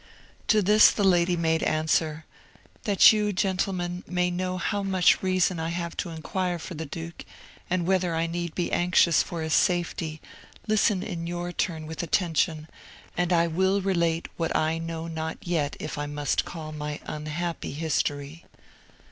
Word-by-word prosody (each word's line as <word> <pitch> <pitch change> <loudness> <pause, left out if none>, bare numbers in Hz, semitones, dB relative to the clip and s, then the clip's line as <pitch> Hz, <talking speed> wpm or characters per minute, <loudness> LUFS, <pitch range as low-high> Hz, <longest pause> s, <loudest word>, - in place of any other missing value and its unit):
To 215 -2 +4
this 210 +3 +7
the 205 - -1
lady 175 -2 +3
made 160 -1 +1
answer, 155 0 0 0.6
"That 205 +1 +7
you, 210 -1 +1
gentlemen, 180 -2 -1
may 180 0 0
know 185 +1 -2
how 205 +2 -1
much 190 -2 +3
reason 185 -2 +1
I 160 0 -2
have 170 0 -4
to - - -2
inquire 175 +2 -2
for 170 +3 -8
the 160 -1 -6
duke, 165 +3 -7 0.5
and 175 -1 0
whether 180 -2 +1
I 165 +1 +1
need 170 0 -4
be 175 - -1
anxious 175 -2 +4
for 165 -2 -4
his 160 0 -1
safety, 170 -3 +1 0.5
listen 210 -2 +2
in 170 -5 -5
your 175 0 -3
turn 160 -3 -2
with 160 0 -5
attention, 165 -2 0 0.5
and 175 0 0
I 170 -1 +4
will 190 +4 +1
relate 170 -4 0
what 165 -1 -1
I 160 +1 +1
know 165 0 -5
not 160 -1 -4
yet 160 -5 -1
if 155 - -5
I 145 - -2
must 145 -1 -1
call 160 -3 -7
my 150 -1 -5
unhappy 155 +3 -4
history." 145 0 -2
170 Hz, 165 wpm, -26 LUFS, 160-185 Hz, 0.6 s, this